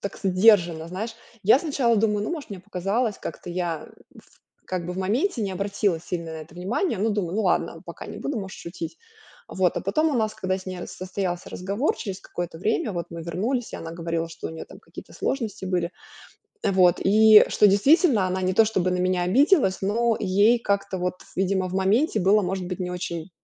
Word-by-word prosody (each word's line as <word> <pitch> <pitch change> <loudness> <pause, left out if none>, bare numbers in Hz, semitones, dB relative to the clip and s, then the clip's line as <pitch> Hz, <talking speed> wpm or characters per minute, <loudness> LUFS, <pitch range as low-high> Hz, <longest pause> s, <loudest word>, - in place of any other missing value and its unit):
так 200 - -5
сдержанно. 180 -4 +4
Знаешь, 220 +6 -5 0.3
я 220 +6 +7
сначала 270 -7 +1
думаю: 210 -1 +1
"Ну, - - -3
может, 305 -8 -6
мне 195 - -6
показалось". 200 +5 -1
Как-то - - -7
я 170 -3 -3 0.3
в - - -20 0.3
как 180 -2 -3
бы 180 - -3
в 185 - -6
моменте 230 - 0
не 195 -2 -2
обратила 200 -2 -1
сильно 170 -1 -5
на - - -6
это 155 +1 -11
внимание. 195 - -1
Ну, 220 +2 +1
думаю: 195 -4 -2
"Ну 220 - +1
ладно, 185 - 0
пока - - -8
не - - -8
буду, 280 -4 -3
можешь 190 -1 -8
шутить". 325 - -7 0.5
Вот 185 -2 +1
а - - 0
потом 305 +12 +1
у - - -1
нас, 215 -1 0
когда 185 -3 -1
с 185 - -12
ней 185 -1 -5
раз - - -7
состоялся 185 -1 -4
разговор, 200 - -1
через 190 -3 -5
какое-то 175 -3 -6
время 215 +1 0
вот 170 -1 -4
мы 170 0 -7
вернулись, 220 +9 -2
и - - -4
она 165 - -7
говорила, 165 -1 -3
что 165 - -7
у - - -7
нее 160 0 -7
там - - -14
какие-то - - -12
сложности 225 -8 -3
были, 180 -2 -1 0.7
э, - - +2
вот. 180 -2 +4
И 215 +2 +7
что, 210 - +4
действительно, 235 - +4
она 185 +1 -2
не 185 0 +1
то 225 - +6
чтобы 185 -4 0
на 180 - 0
меня 180 0 +1
обиделась, 245 - +3
но 230 +3 +1
ей 205 +6 +4
как-то 200 -2 -1
вот, 180 0 -3
видимо, 190 0 0
в 185 - -6
моменте 210 +5 +2
было, 200 +3 +4
может 185 0 -2
быть, 180 - -4
не 180 0 -2
очень 175 0 -5
190 Hz, 215 wpm, -24 LUFS, 180-220 Hz, 0.7 s, я